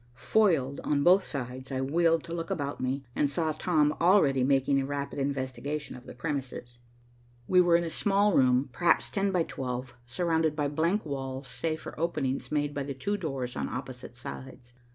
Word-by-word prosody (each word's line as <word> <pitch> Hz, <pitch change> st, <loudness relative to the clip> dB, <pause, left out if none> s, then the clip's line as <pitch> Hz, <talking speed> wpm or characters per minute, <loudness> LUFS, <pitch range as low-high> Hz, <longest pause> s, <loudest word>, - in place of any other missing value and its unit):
Foiled 160 Hz, -12 st, +2 dB
on 140 Hz, -1 st, +1 dB
both 185 Hz, +4 st, +6 dB
sides, 130 Hz, -2 st, -6 dB
I 130 Hz, -, -1 dB
wheeled 165 Hz, +4 st, +2 dB
to 165 Hz, -, -7 dB
look 165 Hz, -1 st, -4 dB
about 145 Hz, -2 st, -3 dB
me, 130 Hz, +2 st, -1 dB
and 145 Hz, -, +2 dB
saw 160 Hz, +2 st, 0 dB
Tom 155 Hz, -1 st, +2 dB
already 165 Hz, -8 st, +4 dB
making 135 Hz, +1 st, +3 dB
a -, -, -2 dB
rapid 140 Hz, 0 st, -4 dB
investigation 140 Hz, +1 st, -3 dB
of 125 Hz, +1 st, -13 dB
the -, -, -9 dB
premises. 125 Hz, -4 st, -5 dB, 0.7 s
We 180 Hz, -1 st, +5 dB
were 175 Hz, -1 st, +4 dB
in 170 Hz, -, +3 dB
a 165 Hz, -, -4 dB
small 205 Hz, +2 st, +2 dB
room, 130 Hz, -1 st, +3 dB
perhaps 175 Hz, +6 st, +2 dB
ten 195 Hz, -1 st, 0 dB
by 180 Hz, -3 st, +2 dB
twelve, 125 Hz, -3 st, -5 dB
surrounded 160 Hz, +1 st, 0 dB
by 145 Hz, -2 st, 0 dB
blank 165 Hz, +8 st, 0 dB
walls, 135 Hz, -2 st, -4 dB
save 155 Hz, +7 st, -3 dB
for -, -, -9 dB
openings 150 Hz, -5 st, -1 dB
made 145 Hz, -1 st, 0 dB
by 140 Hz, -, -3 dB
the 140 Hz, 0 st, -4 dB
two 200 Hz, +11 st, -1 dB
doors 135 Hz, -9 st, -4 dB
on -, -, -2 dB
opposite 125 Hz, -1 st, -7 dB
sides. 120 Hz, 0 st, -9 dB
145 Hz, 185 wpm, -29 LUFS, 130-165 Hz, 0.7 s, both